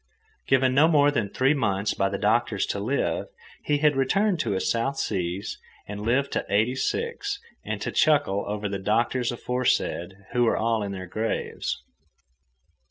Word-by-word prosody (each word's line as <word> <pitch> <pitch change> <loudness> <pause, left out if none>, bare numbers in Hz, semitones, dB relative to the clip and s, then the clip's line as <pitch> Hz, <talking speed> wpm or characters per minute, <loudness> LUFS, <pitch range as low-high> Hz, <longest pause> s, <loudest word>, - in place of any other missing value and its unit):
Given 130 -1 +3
no 145 +4 +6
more 145 -3 +4
than 110 -8 -1
three 130 +6 +2
months 105 -7 0
by 95 - +1
the 100 - -3
doctors 105 0 +1
to 100 - -3
live, 125 +8 -1 0.4
he 150 - +2
had 150 0 +3
returned 185 +8 +2
to - - 0
his 95 - -1
South 135 +4 0
Seas 90 +1 -2 0.3
and 105 0 -6
lived 125 +6 +1
to - - -1
eighty 110 +5 +2
six 465 - -2 0.3
and - - -3
to - - -2
chuckle 100 -10 +3
over 105 0 -2
the 100 -1 -3
doctors 120 +5 +1
aforesaid, 120 -7 -1 0.2
who 120 - +3
were 115 - +2
all 115 0 +1
in 100 -1 -3
their 95 -1 -5
graves. 110 +5 -3
115 Hz, 165 wpm, -26 LUFS, 100-135 Hz, 0.4 s, no